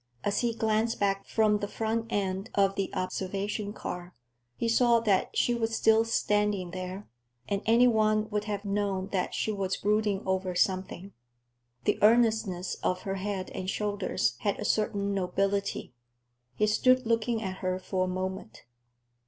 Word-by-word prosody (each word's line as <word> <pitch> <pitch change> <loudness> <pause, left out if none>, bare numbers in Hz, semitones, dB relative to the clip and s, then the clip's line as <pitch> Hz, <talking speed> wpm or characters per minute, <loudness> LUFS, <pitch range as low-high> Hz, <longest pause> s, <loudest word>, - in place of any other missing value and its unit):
As 205 - 0
he 235 -2 0
glanced 220 +1 0
back 195 -1 0
from 215 -2 +2
the 205 - -3
front 225 +2 -2
end 195 0 -2
of 195 -1 +3
the 195 -1 -2
observation 200 +3 -3
car, 180 -3 -7 0.4
he 235 - -1
saw 235 0 +4
that 205 -4 +1
she 240 - +3
was 225 -1 -1
still 220 0 +4
standing 210 -5 0
there, 185 +2 -6 0.4
and 200 -1 -1
any 235 +2 +6
one 215 -2 +2
would 210 0 -1
have 205 -1 -4
known 200 -1 -1
that 185 -2 -1
she 220 - 0
was 195 -2 -2
brooding 210 -1 +1
over 190 -1 -1
something. 185 +1 -1 0.7
The - - +1
earnestness 220 -5 +3
of 180 0 -1
her 195 0 -3
head 195 -1 -3
and 185 0 -4
shoulders 200 - -1
had 200 -1 -1
a - - -3
certain 200 -2 0
nobility. 195 -3 -1 0.6
He 210 - +2
stood 255 +4 +3
looking 230 0 0
at 190 -1 -4
her 185 -1 -1
for 185 0 -1
a - - -4
moment. 185 - -5
200 Hz, 160 wpm, -29 LUFS, 190-220 Hz, 0.7 s, any